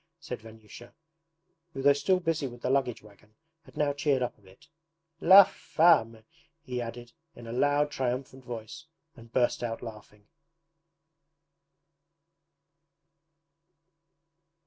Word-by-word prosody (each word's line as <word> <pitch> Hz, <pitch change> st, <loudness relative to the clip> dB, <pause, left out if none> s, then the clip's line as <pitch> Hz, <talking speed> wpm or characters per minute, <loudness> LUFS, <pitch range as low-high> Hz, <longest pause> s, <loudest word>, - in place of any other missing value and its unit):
said 125 Hz, -7 st, -7 dB
Vanyusha, 110 Hz, +1 st, -14 dB, 0.8 s
who 135 Hz, -, -5 dB
though 140 Hz, 0 st, +6 dB
still 145 Hz, +7 st, +1 dB
busy 165 Hz, -5 st, -1 dB
with 120 Hz, -1 st, -12 dB
the 125 Hz, -, 0 dB
luggage 135 Hz, -5 st, 0 dB
wagon 105 Hz, +1 st, -20 dB, 0.3 s
had -, -, -17 dB
now 145 Hz, -1 st, +1 dB
cheered 140 Hz, -2 st, 0 dB
up 125 Hz, -, -4 dB
a -, -, -29 dB
bit. 95 Hz, +7 st, -20 dB, 0.5 s
'LA 195 Hz, +3 st, +9 dB
FAME!' 155 Hz, -, +2 dB, 0.4 s
he 125 Hz, -1 st, -4 dB
added 120 Hz, 0 st, -8 dB, 0.2 s
in 120 Hz, -, -12 dB
a 115 Hz, -, -7 dB
loud 145 Hz, +3 st, +1 dB
triumphant 130 Hz, 0 st, -4 dB
voice 120 Hz, +7 st, -8 dB, 0.3 s
and 115 Hz, -2 st, -15 dB
burst 120 Hz, -1 st, +1 dB
out 115 Hz, -1 st, -4 dB
laughing. 105 Hz, -2 st, -12 dB
125 Hz, 120 wpm, -28 LUFS, 115-145 Hz, 0.8 s, LA